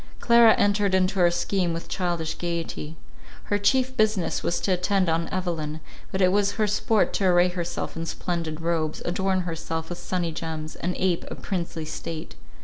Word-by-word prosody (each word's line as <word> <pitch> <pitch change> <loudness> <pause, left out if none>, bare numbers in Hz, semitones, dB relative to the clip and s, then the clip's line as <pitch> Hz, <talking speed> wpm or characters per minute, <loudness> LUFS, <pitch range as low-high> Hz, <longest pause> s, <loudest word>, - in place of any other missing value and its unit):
Clara 235 -2 +6
entered 200 -1 +2
into 190 +1 +1
our 175 -1 +6
scheme 175 0 0
with 165 - -5
childish 170 -3 -1
gaiety. 165 -2 -4 0.5
Her 205 - 0
chief 260 +5 +2
business 215 -6 +1
was 170 - 0
to 195 - 0
attend 185 0 +2
on 165 +1 0
Evelyn; 165 -5 -3 0.3
but 190 - -1
it 185 -1 +5
was 200 0 +2
her 215 - +1
sport 210 +1 +1
to 195 - 0
array 180 0 +5
herself 175 -1 -4
in 165 0 -4
splendid 165 -3 -3
robes, 165 -2 -1
adorn 190 +1 +1
herself 165 -1 -4
with 175 -1 -5
sunny 175 -1 -2
gems, 160 -1 -5
and 180 +1 -2
ape 185 -2 +1
a - - -5
princely 170 -4 -4
state. 160 +1 -6
175 Hz, 175 wpm, -25 LUFS, 165-195 Hz, 0.5 s, Clara